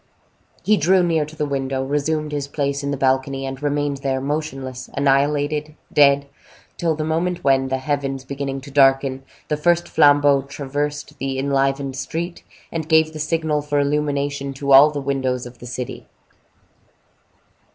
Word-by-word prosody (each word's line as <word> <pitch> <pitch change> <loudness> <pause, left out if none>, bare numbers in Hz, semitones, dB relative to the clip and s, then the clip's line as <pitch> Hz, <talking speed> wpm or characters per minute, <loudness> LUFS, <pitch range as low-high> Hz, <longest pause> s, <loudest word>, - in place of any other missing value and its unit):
He 215 0 +3
drew 180 +4 +3
near 165 -3 +1
to 155 +1 -12
the 150 - -1
window, 135 -2 -2
resumed 150 +2 -1
his 145 -1 -3
place 140 -1 -2
in 140 - -3
the 140 - -2
balcony, 135 +1 0
and 135 0 -6
remained 145 -1 -1
there, 135 -1 -1
motionless, 135 -3 -4
annihilated, 145 +2 +1 0.2
dead, 140 -1 +5 0.5
till 165 -2 0
the 155 - -3
moment 170 +3 -1
when, 135 -1 +3
the 130 0 -1
heavens 135 -1 -2
beginning 135 0 -4
to 140 +1 -11
darken, 135 -1 +3 0.3
the 150 - -1
first 175 +2 +2
flambeaux 145 -2 +4
traversed 145 +2 -4
the 135 0 -2
enlivened 135 0 0
street, 165 +6 -4 0.3
and 160 -1 -4
gave 160 -1 +4
the 155 - -7
signal 155 -1 0
for 145 0 -1
illumination 140 -1 -1
to 140 +1 -2
all 140 +3 +9
the 150 -1 -4
windows 130 -2 -1
of 120 -1 -12
the 120 - -9
city. 125 0 -6
140 Hz, 160 wpm, -21 LUFS, 135-150 Hz, 0.5 s, all